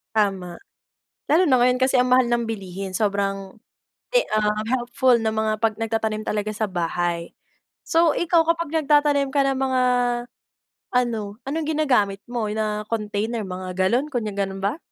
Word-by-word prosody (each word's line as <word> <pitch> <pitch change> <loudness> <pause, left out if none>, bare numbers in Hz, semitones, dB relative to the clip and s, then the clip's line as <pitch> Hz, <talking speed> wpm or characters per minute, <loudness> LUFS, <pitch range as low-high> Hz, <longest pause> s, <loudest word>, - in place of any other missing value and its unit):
Tama. 195 -5 0 0.7
Lalo 320 +5 +4
na 260 - +5
ngayon 250 +1 +3
kasi 260 0 +3
ang 250 0 +3
mahal 250 0 +4
ng 240 0 +1
bilihin 195 -3 -5
sobrang 195 -1 -1 0.6
e - - +5
ah, 210 -1 +1 0.2
helpful 245 0 +2
na 220 -1 -1
mga 220 0 0
'pag 225 0 +1
nagtatanim 220 -1 -1
talaga 215 0 -2
sa 215 0 -2
bahay. 175 -1 -2 0.5
So, 330 -1 +3
ikaw 335 -1 +2
kapag 335 -2 0
nagtatanim 290 -2 +3
ka 275 0 +1
ng 270 -1 0
mga 260 -1 +1 1.1
ano, 225 -5 0
anong 305 +3 -2
ginagamit 250 -11 +1
mo 240 -3 -2
na 210 0 -2
container, 215 +1 -2
mga 185 0 -6
galon, 235 +10 +2
kunya 230 -5 -2
ganun 195 -1 -2
ba? 205 +10 -1
225 Hz, 155 wpm, -23 LUFS, 200-260 Hz, 1.1 s, na